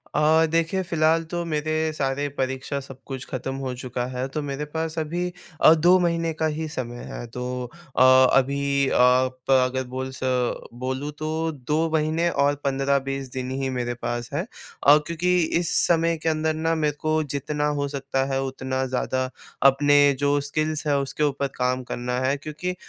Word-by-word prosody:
अ, 155 +2 +4
देखिए, 165 +3 +1
फिलहाल 165 -1 +2
तो 175 0 -1
मेरे 155 0 -1
सारे 140 0 -1
परीक्षा, 135 +2 -2
सब 135 -1 -11
कुछ 130 -2 -6
खत्म 135 +1 -4
हो 135 -2 -4
चुका 125 -1 -4
है, 125 +1 -2
तो 150 +3 -4
मेरे 145 +1 -4
पास 160 +2 -4
अभी 175 +3 -2 0.3
अ, 160 - +8
2 175 +3 +5
महीने 170 -1 0
का 160 - -1
ही 160 0 -3
समय 120 -5 -5
है, 120 - -6
तो 125 +1 -4 0.3
अ, - - +4 0.4
अभी 140 +1 +1
अ, - - -1
प 130 +1 +3 0.2
अगर 130 +1 -2
बोल 130 +1 -4
स - - -10 0.6
बोलूँ, 130 +3 -3
तो 155 +2 -2
2 150 +3 -1
महीने 160 +2 +1
और 145 -2 +2
15-20 135 -1 0
दिन 130 -1 -4
ही 135 - -1
मेरे 120 -1 -2
पास 120 0 -4
हैं 165 +5 0 0.4
अ, 145 +1 +9
क्योंकि 180 +2 +1 0.2
इस 170 -2 -1
समय 165 -1 +2
के 165 - +2
अंदर 155 0 0
ना, 160 +1 0
मेरे 150 -2 0
को 155 0 +1
जितना 145 +1 -2
हो 140 - 0
सकता 135 -1 -2
है, 135 - +1
उतना 130 0 -3
ज़्यादा 130 0 -1 0.4
अपने 145 +2 +3 0.2
जो 145 0 +2
स्किल्स 155 +2 -2
हैं, 145 - +3
उसके 140 +2 -1
ऊपर 140 -1 0
काम 125 0 0
करना 125 0 -3
है, 130 +2 +1
क्योंकि 155 +5 -5
140 Hz, 180 wpm, -24 LUFS, 130-155 Hz, 0.6 s, अ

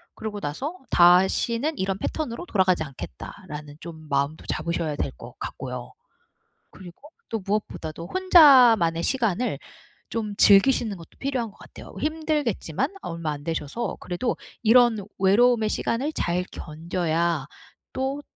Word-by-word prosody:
그러고 215 -2 -5
나서 275 - -4
'다시는 190 - +4
이런 190 0 -1
패턴으로 300 - -4
돌아가지 185 - +2
않겠다.'라는 145 - -9
좀 160 -2 -10
마음도 140 +3 -1
잡으셔야 160 -1 -2
될 135 - -2
것 120 +1 -12
같고요. 125 -2 -6 0.8
그리고 180 +7 -13 0.3
또 225 - -2
무엇보다도 170 -5 -3
혼자만의 250 - +6
시간을 245 -3 0 0.5
좀 215 -3 -3
즐기시는 205 0 +5
것도 165 - -13
필요한 260 -5 -2
것 - - -24
같아요. - - -13
힘들겠지만 300 - -1
얼마 165 -2 -4
안 145 -1 -6
되셔서 165 +8 -3
그래도 180 +8 -2 0.3
이런 225 -3 +5
외로움의 220 +3 +4
시간을 275 +9 -1
잘 175 +1 -1
견뎌야 165 -1 -2 0.5
또 270 +2 -2
195 Hz, 305 characters per minute, -25 LUFS, 160-245 Hz, 0.8 s, 혼자만의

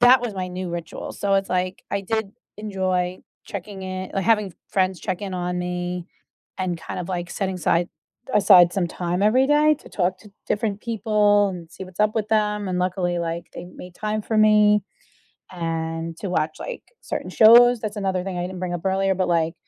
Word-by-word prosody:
that 245 +1 +7
was 240 -4 -4
my 185 -1 -3
new 180 0 -5
ritual, 170 -1 -6
so 200 -1 0
it's 195 0 +1
like, 185 +1 -1
I 200 - -1
did 220 0 -2 0.3
enjoy 185 -3 -1 0.2
checking 200 0 -7
in 185 0 -5
like, 195 - 0
having 210 -3 +2 0.2
friends 185 -3 0
check 180 +3 -3
in 195 -2 -4
on 180 0 -2
me, 180 0 -3 0.5
and 185 -2 -1
kind 160 - -6
of 175 - -6
like 175 -2 -3
setting 190 -2 -2
aside 175 0 +1 0.5
aside 180 -4 +7
some 190 -3 0
time 175 +2 -2
every 250 +6 +4
day 300 +1 +4
to 295 - -19
talk 185 -1 0
to 210 +1 -16 0.2
different 210 -1 -1
people 210 -3 +2
and 175 -3 -8
see 190 - -8
what's 185 +1 -9
up 210 0 +3
with 215 -2 -1
them, 210 -2 +1
and 180 -1 -1
luckily, 180 -1 0
like, 170 0 -3
they 175 - -7
made 180 0 -12
time 215 +1 -2
for 220 - -2
me 210 -1 +5 0.7
and 165 -1 -3
to 200 - -4
watch 155 -3 -1
like - - -6 0.2
certain - - -5
shows, 240 +2 +7
that's 215 -1 -4
another 190 -3 -1
thing 190 -2 -4
I - - -1
didn't 185 +1 -5
bring 180 -1 -2
up 175 0 -5
earlier, 190 0 +2
but, 185 -1 0
like, 165 -1 +1
190 Hz, 200 wpm, -23 LUFS, 180-210 Hz, 0.7 s, that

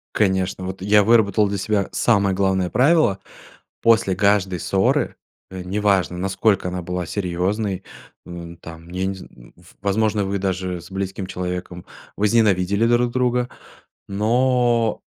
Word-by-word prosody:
Конечно, 95 -2 0
вот 95 0 -6
я 105 +1 +5
выработал 110 -2 +3
для 100 - -2
себя 100 0 0
самое 100 -5 +2
главное 95 -2 +1
правило: 135 - +3 0.6
после 110 -4 +3
каждой 100 -2 +2
ссоры, 95 0 +1 0.3
э, 95 -1 -7
неважно, 95 -2 0
насколько 95 +1 +1
она 90 0 -4
была 90 0 -4
серьезной, 95 +2 -2 0.4
м, 85 -1 -8
там, 80 +1 -12
я 95 +1 -2
не 95 - -2
зн 75 -10 -14
в - - -20
возможно, 105 +1 +1
вы 100 +1 -2
даже 95 -2 -2
с - - -14
близким 95 0 -4
человеком 90 -1 -5 0.3
возненавидели 100 -1 +2
друг 120 +1 +2
друга, 125 -1 +1 0.6
но 120 +2 +1
95 Hz, 135 wpm, -21 LUFS, 90-105 Hz, 0.6 s, я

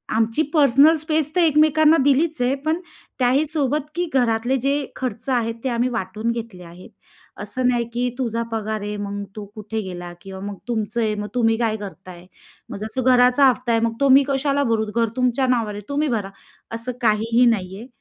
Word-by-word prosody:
आमची 225 +5 +1
personal 290 +1 +5
space 310 -1 -1
तर - - +3
एकमेकांना 310 0 +4
दिलीच 285 +1 +2
आहे, 250 +2 +2
पण 320 +2 +1 0.4
त्याही 260 +4 +3
सोबत, 295 -1 -1
की 350 +1 0
घरातले 240 0 +1
जे 280 0 -1
खर्च 255 0 -5
आहेत 230 -3 0
ते 265 - 0
आम्ही 240 +1 0
वाटून 220 0 -3
घेतले 225 -6 -7
आहेत. 175 +2 -13 0.5
असं 255 -1 -2
नाही, 240 -1 0
की 245 +1 0
तुझा 230 -2 -1
पगार 220 -1 -3
आहे. 210 +1 -4
मग 205 0 -4
तू 210 - -6
कुठे 220 +1 -4
गेला 175 -3 -7
किंवा 190 -1 -9
मग 205 - -6
तुमचं 225 0 -1
आहे 215 -1 0
मग 210 0 -4
तुम्ही 225 -2 +2
काय 225 -2 0
करताय? 185 -2 -10 0.4
मग - - -6
जसं 220 +4 -3
घराचा 250 +2 +5
हफ्ता 250 -1 -1
आहे 225 - +2
मग 230 - -1
तो 275 - +4
मी 280 - +4
कशाला 280 +1 +1
भरू? 225 -3 0
घर 230 -2 +2
तुमच्या 255 +1 +1
नावावर 230 -4 0
आहे 205 - -7
तुम्ही 290 +2 0
भरा, 195 -2 -5 0.5
असं 230 +2 -4
काहीही 230 +2 +3
नाही 190 -1 -7
आहे. 230 +5 -10
235 Hz, 195 wpm, -21 LUFS, 215-275 Hz, 0.5 s, personal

